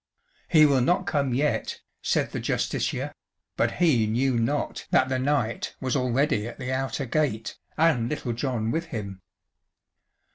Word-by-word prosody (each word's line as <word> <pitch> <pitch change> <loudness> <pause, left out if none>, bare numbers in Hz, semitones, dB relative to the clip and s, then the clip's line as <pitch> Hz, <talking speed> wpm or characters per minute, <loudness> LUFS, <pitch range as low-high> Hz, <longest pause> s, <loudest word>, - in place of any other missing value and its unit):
"He 155 -2 +6
will 140 -3 +4
not 175 +8 +2
come 145 -8 0
yet," 140 +5 0 0.2
said - - 0
the - - -3
Justiciar, - - -1 0.4
but - - +1
he 135 -11 +3
knew 125 +4 +1
not 130 +5 -1
that 130 - +3
the 130 -1 0
knight 130 -4 -1
was 130 -2 -1
already 125 -2 +1
at - - -8
the 130 -1 -3
outer 135 +1 -2
gate, 120 -4 -1 0.2
and 155 -8 +3
Little 135 -5 -2
John 115 -2 -1
with 165 +4 -1
him. 100 - -6
130 Hz, 150 wpm, -26 LUFS, 115-150 Hz, 0.4 s, He